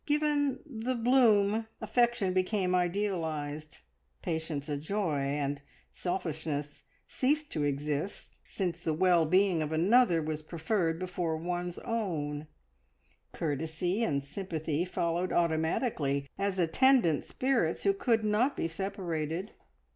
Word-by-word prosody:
Given 295 Hz, -2 st, +1 dB
"the 255 Hz, -3 st, -3 dB
bloom," 225 Hz, -3 st, +4 dB
affection 240 Hz, -6 st, +1 dB
became 185 Hz, 0 st, +1 dB
idealised, 165 Hz, -5 st, -2 dB, 0.4 s
patience 160 Hz, -4 st, -3 dB
a 150 Hz, -, -1 dB
joy, 160 Hz, +1 st, -1 dB
and 140 Hz, +1 st, -1 dB, 0.3 s
selfishness 155 Hz, -5 st, -3 dB, 0.3 s
ceased 295 Hz, +3 st, 0 dB
to 150 Hz, -, -1 dB
exist, 145 Hz, +5 st, -3 dB
since 175 Hz, -3 st, -3 dB
the 160 Hz, -, 0 dB
well 175 Hz, -2 st, +4 dB
being 185 Hz, -1 st, +3 dB
of 155 Hz, 0 st, -2 dB
another 180 Hz, +3 st, +4 dB
was 155 Hz, 0 st, -3 dB
preferred 165 Hz, +1 st, -1 dB
before 175 Hz, -2 st, -2 dB
one's 175 Hz, +1 st, -3 dB
own; 155 Hz, -11 st, -3 dB, 0.8 s
courtesy 160 Hz, -, -1 dB
and 140 Hz, -8 st, 0 dB
sympathy 160 Hz, 0 st, -3 dB
followed 175 Hz, 0 st, -1 dB
automatically, 160 Hz, -, 0 dB
as 195 Hz, -1 st, -1 dB
attendant 175 Hz, -, +4 dB
spirits 255 Hz, -11 st, 0 dB
who 395 Hz, -, +4 dB
could 240 Hz, -, +1 dB
not 215 Hz, +6 st, +2 dB
be -, -, 0 dB
separated. 175 Hz, -1 st, -3 dB
175 Hz, 115 wpm, -30 LUFS, 155-210 Hz, 0.8 s, bloom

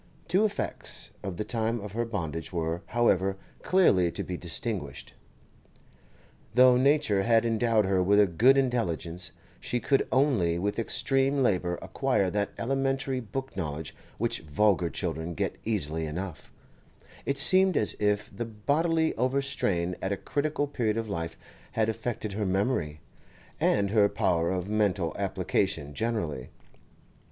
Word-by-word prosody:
Two 190 Hz, +6 st, +3 dB
effects 210 Hz, -, -3 dB
of 95 Hz, -4 st, -5 dB
the -, -, -1 dB
time 115 Hz, +1 st, -1 dB
of 105 Hz, -1 st, -7 dB
her 120 Hz, +3 st, -2 dB
bondage 80 Hz, -8 st, -4 dB
were, 85 Hz, -1 st, -2 dB
however, 95 Hz, -5 st, +1 dB, 0.2 s
clearly 95 Hz, -, +3 dB
to -, -, -1 dB
be 90 Hz, -, -5 dB
distinguished. 85 Hz, -, -4 dB, 1.4 s
Though 125 Hz, 0 st, +7 dB
nature 130 Hz, -6 st, +3 dB
had 115 Hz, +2 st, +3 dB
endowed 115 Hz, -2 st, +2 dB
her 95 Hz, -1 st, +2 dB
with 100 Hz, +3 st, +4 dB
a 105 Hz, -, +7 dB
good 115 Hz, +10 st, +4 dB
intelligence, 90 Hz, -, -1 dB, 0.3 s
she 125 Hz, -, -2 dB
could 135 Hz, +3 st, +1 dB
only 120 Hz, -, +2 dB
with 100 Hz, +5 st, -2 dB
extreme 135 Hz, +3 st, +1 dB
labour 90 Hz, -6 st, +1 dB
acquire 95 Hz, -2 st, 0 dB
that 105 Hz, -1 st, -1 dB
elementary 135 Hz, +1 st, -1 dB
book 130 Hz, +3 st, -6 dB
knowledge 75 Hz, 0 st, -4 dB, 0.2 s
which -, -, -1 dB
vulgar 90 Hz, +3 st, +1 dB
children 80 Hz, +3 st, -3 dB
get -, -, -3 dB
easily 80 Hz, -7 st, -1 dB
enough; 90 Hz, +2 st, -6 dB, 0.8 s
it 140 Hz, -, +1 dB
seemed 185 Hz, +4 st, +7 dB
as 105 Hz, -, +2 dB
if 105 Hz, +1 st, 0 dB
the 120 Hz, -, -3 dB
bodily 160 Hz, +9 st, 0 dB
overstrain 125 Hz, -9 st, 0 dB
at 95 Hz, -, -2 dB
a 100 Hz, -, -1 dB
critical 145 Hz, +4 st, -1 dB
period 115 Hz, -6 st, -1 dB
of 115 Hz, -1 st, -3 dB
life 85 Hz, -3 st, -4 dB, 0.4 s
had 110 Hz, -1 st, +1 dB
affected 110 Hz, -2 st, -3 dB
her 105 Hz, +1 st, -2 dB
memory, 95 Hz, -, -1 dB, 0.6 s
and 100 Hz, -1 st, +2 dB
her 105 Hz, -2 st, +4 dB
power 85 Hz, -2 st, +1 dB
of 90 Hz, 0 st, -2 dB
mental 100 Hz, -5 st, 0 dB
application 95 Hz, -5 st, -1 dB
generally. 85 Hz, -, -2 dB
105 Hz, 140 wpm, -28 LUFS, 90-125 Hz, 1.4 s, Though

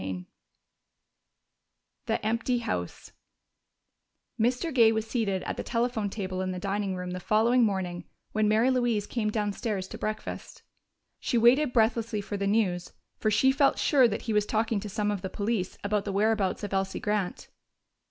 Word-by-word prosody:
CHAPTER 95 Hz, 0 st, -3 dB
XVII 90 Hz, -, -10 dB, 1.8 s
The -, -, -1 dB
Empty 230 Hz, +3 st, +1 dB
House 90 Hz, -, -4 dB, 1.3 s
Mr. 250 Hz, +8 st, +1 dB
Gay 230 Hz, -3 st, +6 dB
was 220 Hz, -1 st, -1 dB
seated 220 Hz, -5 st, -1 dB
at -, -, -4 dB
the -, -, -3 dB
telephone 230 Hz, -3 st, -1 dB
table 190 Hz, -2 st, -4 dB
in 185 Hz, -, -2 dB
the 185 Hz, -, -3 dB
dining 195 Hz, +1 st, -2 dB
room 180 Hz, 0 st, -5 dB
the 180 Hz, -, -4 dB
following 230 Hz, +6 st, +3 dB
morning 185 Hz, -5 st, -1 dB, 0.3 s
when 215 Hz, -1 st, +1 dB
Mary 220 Hz, +5 st, +3 dB
Louise 240 Hz, -5 st, +1 dB
came 215 Hz, -2 st, -1 dB
downstairs 210 Hz, -2 st, -2 dB
to -, -, -8 dB
breakfast. 215 Hz, 0 st, -5 dB, 0.6 s
She 240 Hz, -, 0 dB
waited 245 Hz, +5 st, +5 dB
breathlessly 225 Hz, -2 st, +1 dB
for 205 Hz, -, -5 dB
the 200 Hz, 0 st, -1 dB
news, 190 Hz, -5 st, 0 dB, 0.3 s
for 215 Hz, -, +1 dB
she 265 Hz, +5 st, +4 dB
felt 275 Hz, 0 st, +3 dB
sure 265 Hz, -5 st, +4 dB
that 210 Hz, -, -3 dB
he 225 Hz, -, -2 dB
was 210 Hz, 0 st, +2 dB
talking 220 Hz, -1 st, 0 dB
to 210 Hz, -, -6 dB
some 210 Hz, 0 st, -1 dB
of 200 Hz, -3 st, -3 dB
the 190 Hz, -, -4 dB
police 205 Hz, -2 st, -2 dB
about 200 Hz, 0 st, 0 dB
the 200 Hz, -, -2 dB
whereabouts 205 Hz, 0 st, +1 dB
of 205 Hz, -, -4 dB
Elsie 195 Hz, 0 st, -1 dB
Grant. 210 Hz, -3 st, -2 dB
215 Hz, 170 wpm, -28 LUFS, 195-230 Hz, 1.8 s, Gay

